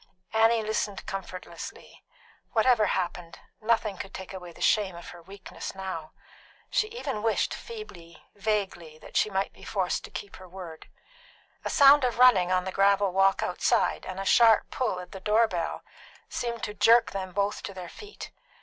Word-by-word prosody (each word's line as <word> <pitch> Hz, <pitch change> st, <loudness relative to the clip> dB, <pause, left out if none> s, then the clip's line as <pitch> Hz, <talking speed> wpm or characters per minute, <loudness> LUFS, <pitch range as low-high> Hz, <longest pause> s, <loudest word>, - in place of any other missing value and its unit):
Annie 225 Hz, 0 st, +4 dB
listened 215 Hz, -2 st, -2 dB
comfortlessly. 185 Hz, -2 st, -8 dB, 0.5 s
Whatever 220 Hz, -1 st, +4 dB
happened, 175 Hz, -2 st, -3 dB, 0.2 s
nothing 215 Hz, -3 st, +1 dB
could 195 Hz, -, -8 dB
take 190 Hz, 0 st, -8 dB
away 180 Hz, -2 st, -8 dB
the -, -, -17 dB
shame 200 Hz, -4 st, +2 dB
of 170 Hz, -, -10 dB
her 175 Hz, -, -11 dB
weakness 195 Hz, +3 st, -9 dB
now. 185 Hz, -5 st, -6 dB, 0.6 s
She 430 Hz, -, +2 dB
even 295 Hz, -, -4 dB
wished, 225 Hz, 0 st, +1 dB
feebly, 190 Hz, -, -10 dB
vaguely, 195 Hz, -6 st, -2 dB
that -, -, -15 dB
she -, -, +3 dB
might 195 Hz, 0 st, -1 dB
be -, -, -17 dB
forced 190 Hz, -4 st, -1 dB
to -, -, -11 dB
keep 200 Hz, -, -8 dB
her 185 Hz, -1 st, -13 dB
word. 175 Hz, -3 st, -10 dB, 0.7 s
A -, -, -2 dB
sound 285 Hz, -1 st, +7 dB
of 245 Hz, -3 st, 0 dB
running 215 Hz, -8 st, +6 dB
on 185 Hz, 0 st, +2 dB
the 190 Hz, -, -4 dB
gravel 200 Hz, 0 st, +3 dB
walk 195 Hz, +1 st, +3 dB
outside -, -, +1 dB
and 185 Hz, 0 st, -5 dB
a 195 Hz, -, -4 dB
sharp 225 Hz, +1 st, +5 dB
pull 245 Hz, -8 st, -1 dB
at 180 Hz, 0 st, -10 dB
the 190 Hz, -, -8 dB
door 215 Hz, +4 st, +3 dB
bell 170 Hz, -5 st, -3 dB, 0.4 s
seemed 235 Hz, -2 st, -4 dB
to 210 Hz, -, -3 dB
jerk 225 Hz, +3 st, +5 dB
them 190 Hz, -1 st, -4 dB
both 200 Hz, +2 st, -1 dB
to -, -, -6 dB
their 180 Hz, -2 st, -7 dB
feet. 415 Hz, -, -10 dB
195 Hz, 175 wpm, -27 LUFS, 185-225 Hz, 0.7 s, sound